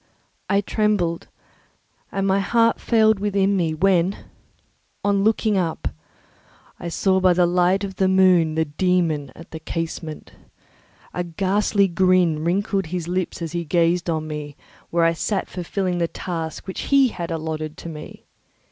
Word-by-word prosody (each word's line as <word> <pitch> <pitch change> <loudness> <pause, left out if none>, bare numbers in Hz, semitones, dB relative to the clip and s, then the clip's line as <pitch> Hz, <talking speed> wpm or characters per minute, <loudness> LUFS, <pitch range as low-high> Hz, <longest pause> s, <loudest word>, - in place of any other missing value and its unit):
I 200 +1 +3
trembled 200 -5 0 0.8
and 195 0 -1
my 195 0 +2
heart 230 +3 +2
failed 220 -3 +3
within 200 -1 +1
me, 165 -4 0
when, 185 +2 +2 0.9
on 200 -1 +2
looking 215 -1 +2
up, 165 -3 -2 0.9
I - - -6
saw 190 +3 +1
by 185 -1 +4
the 175 0 +3
light 180 +3 +2
of 195 -1 -5
the 190 - +3
moon 185 -4 +4
the 160 0 +1
dæmon 160 -3 0
at 165 - -13
the 160 - -6
casement. 160 -1 -5 0.8
A 180 - -2
ghastly 195 +3 +1
grin 180 -3 +2
wrinkled 195 +1 0
his 170 0 -4
lips 180 -1 -2
as 165 - -4
he 170 0 -2
gazed 170 +2 +1
on 155 -1 -1
me, 150 -2 -6 0.3
where 170 0 +1
I 165 0 +4
sat 195 +4 -2
fulfilling 180 0 -2
the 170 - +1
task 165 -3 -5
which 190 - -5
he 275 -2 +5
had 175 -5 -5
allotted 155 -1 -4
to 170 - -8
me. 155 -1 -10
180 Hz, 155 wpm, -22 LUFS, 165-195 Hz, 0.9 s, he